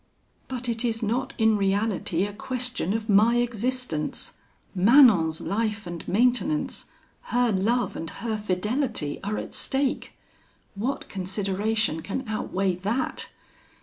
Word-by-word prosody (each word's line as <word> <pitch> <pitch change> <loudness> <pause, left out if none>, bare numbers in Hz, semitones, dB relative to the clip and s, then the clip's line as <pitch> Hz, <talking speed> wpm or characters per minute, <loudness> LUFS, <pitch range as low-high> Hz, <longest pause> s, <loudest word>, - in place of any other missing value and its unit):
"'But 255 -1 -4
it 230 0 -1
is 225 -1 -1
not 235 +5 -1
in 220 -2 +4
reality 195 -3 0
a 205 - -5
question 250 -3 -2
of 220 0 -2
my 215 +3 +5
existence! 240 -7 -1 0.4
Manon's 195 - +6
life 215 +1 -1
and 175 -1 -7
maintenance, 250 +8 +1 0.4
her 245 -1 +2
love 220 +6 +1
and 165 - -4
her 230 -2 -3
fidelity, 210 - -1
are 210 +2 -2
at - - -6
stake! 270 0 -1 0.6
What 235 +8 -3
consideration 195 -1 -1
can 215 +9 -4
outweigh 195 -3 -1
that? 215 +8 -2
220 Hz, 120 wpm, -26 LUFS, 195-245 Hz, 0.6 s, Manon's